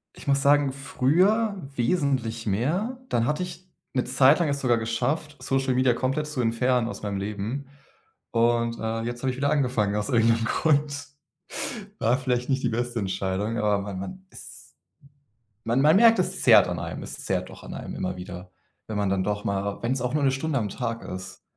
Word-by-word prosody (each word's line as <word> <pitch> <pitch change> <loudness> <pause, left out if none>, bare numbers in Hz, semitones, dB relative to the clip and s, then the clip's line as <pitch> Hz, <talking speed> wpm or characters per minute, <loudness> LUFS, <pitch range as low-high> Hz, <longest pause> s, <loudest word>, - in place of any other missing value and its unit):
Ich - - -13
muss 140 0 +2
sagen, 145 -1 +4
früher 185 - +2 0.2
wesentlich 120 -5 0
mehr, 170 - 0
dann 115 0 +1
hatte 150 +4 0
ich 180 +1 -7 0.3
'ne 130 - +1
Zeit 135 +4 +5
lang 165 - +2
es 140 0 -1
sogar 120 -3 +3
geschafft, 145 +7 -2
Social 135 -1 0
Media 125 -1 +3
komplett 135 +4 -1
zu 150 -4 -3
entfernen 120 +1 +1
aus - - -7
meinem 100 -1 -2
Leben. 105 +7 -4 0.7
Und, 115 0 +2
äh, 115 0 -2
jetzt 120 +1 -5
habe 130 - +1
ich 125 - -5
wieder 140 +2 +1
angefangen 125 -8 +1
aus 105 0 -1
irgend 115 -1 +4
'nem 115 - -2
Grund. 145 -2 +1 0.9
War 120 +3 +3
vielleicht 125 -1 -1
nicht 135 0 +1
die 125 - +1
beste 120 +1 -2
Entscheidung, 95 +3 -2
aber 105 -2 +2
man 100 -2 -5
man 185 - -8
ist - - -12 0.9
...man 120 +4 +1
man 155 +5 +6
merkt, 230 -1 +6
es 180 - -1
zerrt - - +7
an - - -3
einem. - - -5
Es - - -7
zerrt - - -1
doch - - -13
an - - -7
einem - - -6
immer 95 0 -3
wieder, 90 0 -8 0.4
wenn 110 - -4
man 100 -2 +1
dann 95 -1 +1
doch 105 +1 -2
mal 100 0 -2
wenn 120 +2 0
es 130 -2 -1
auch 125 +3 -2
nur 150 - +1
'ne 135 - +4
Stunde 140 +1 -1
am 105 -3 -1
Tag 115 -2 -3
ist, 95 0 -7
125 Hz, 200 wpm, -26 LUFS, 110-140 Hz, 0.9 s, zerrt